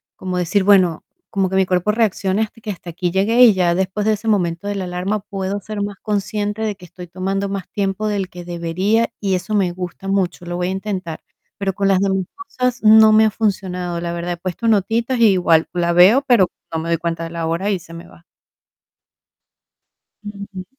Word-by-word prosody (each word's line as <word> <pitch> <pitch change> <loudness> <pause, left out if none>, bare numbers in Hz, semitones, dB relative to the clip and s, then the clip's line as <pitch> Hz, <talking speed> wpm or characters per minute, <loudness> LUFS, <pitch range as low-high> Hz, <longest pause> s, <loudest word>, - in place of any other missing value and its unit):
como 185 -1 -4
decir: 185 +3 +1
"Bueno, 185 -5 +4 0.3
como 195 -3 0
que 190 - -1
mi 190 - +3
cuerpo 180 +3 +1
reaccione 210 -2 0
hasta 220 +1 -9
que 210 - -4
hasta 175 -2 -9
aquí 175 +1 -2
llegué". 215 +6 +2
Y 230 -4 +8
ya 175 -2 +1
después 190 +3 -1
de 220 - +3
ese 215 +2 -3
momento 180 -2 0
de 205 - -2
la 190 -2 -3
alarma 180 +4 -2
puedo 195 0 -4
ser 210 +1 -6
más 205 -1 -4
consciente 210 0 -2
de 215 -2 -1
que 180 -2 -14
estoy 175 +1 -11
tomando 195 +3 -3
más 195 -1 -5
tiempo 200 +1 -2
del 195 -3 -2
que 175 -1 -10
debería 180 +6 0
y 195 -3 0
eso 190 +4 -3
me 185 -4 +1
gusta 180 +1 -7
mucho, 185 -3 -1
lo 175 0 -4
voy 180 0 -1
a - - -1
intentar. 190 -4 -4 0.4
Pero 195 -1 -2
con 195 0 0
las 190 -1 +3
demás 190 -2 0 0.2
cosas 250 -1 -2
no 220 0 +7
me 220 +1 +6
ha - - +3
funcionado, 180 -5 -2
la 170 0 -4
verdad. 175 +1 -3
He - - -7
puesto 185 +6 -4
notitas 230 +4 +1
y 230 - +6
igual 165 -3 +3
la 170 -1 0
veo, 190 +10 +6
pero 230 -9 +4 0.3
no 160 - -1
me 165 - -5
doy 170 - +2
cuenta 165 0 -3
de - - -6
la 165 -1 -3
hora 170 +5 -1
y 190 - -1
se 165 0 -14
me 170 - -10
va. 170 - -19 2.0
Ujú. 200 -2 -8
190 Hz, 215 wpm, -19 LUFS, 175-210 Hz, 2.0 s, Y